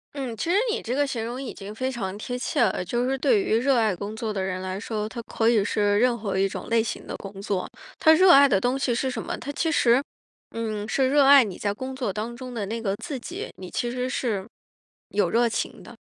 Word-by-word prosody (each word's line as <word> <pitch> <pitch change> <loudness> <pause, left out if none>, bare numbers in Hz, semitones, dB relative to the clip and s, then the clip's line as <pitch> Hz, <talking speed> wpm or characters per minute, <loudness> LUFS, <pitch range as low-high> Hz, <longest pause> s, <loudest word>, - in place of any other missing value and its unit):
嗯， 255 -5 -4
其 330 - -3
实 390 - +4
你 450 - -1
这 245 - -3
个 285 +1 +1
形 230 -4 -3
容 245 +3 -5
已 260 - -6
经 200 +1 -8
非 260 +4 -2
常 200 -6 -4
贴 245 +3 -4
切 250 - -1
了。 190 -4 +2
就 240 +7 -1
是 270 0 0
对 415 - +3
于 375 - +1
热 260 +1 +2
爱 215 -5 +2
工 205 +3 -6
作 220 -1 -3
的 195 - -2
人 185 -1 -3
来 185 0 -4
说， 215 0 -3
他 235 +1 -6
可 225 0 -1
以 225 -4 +4
是 205 0 +1
任 245 -1 +3
何 200 -3 -2
一 195 0 +2
种 - - -7
类 230 -1 +3
型 - - -5
的 - - -5
工 195 0 -9
作， 195 -3 -2 0.3
他 315 - +5
热 365 +2 +7
爱 280 0 +8
的 195 -7 +2
东 250 +4 0
西 255 -3 0
是 260 +2 0
什 - - -4
么？ - - -4
他 285 - -8
其 325 +2 0
实， 250 -1 +4 0.5
嗯， 215 -2 -3
是 260 +3 +1
热 285 0 +5
爱 275 -3 +8
你 190 -3 -6
在 205 -1 -1
工 260 +4 -6
作 250 -7 -2
当 220 +4 -4
中 255 0 -8
的 210 -4 -3
那 225 +3 -4
个 195 -3 -1
自 300 -6 -5
己， 350 - -7
你 185 -1 -9
其 240 - -1
实 250 +1 -2
是 215 -7 -2 0.7
有 200 -4 +1
热 235 +1 +3
情 225 - -3
的。 - - -12
235 Hz, 280 characters per minute, -25 LUFS, 205-260 Hz, 0.7 s, 爱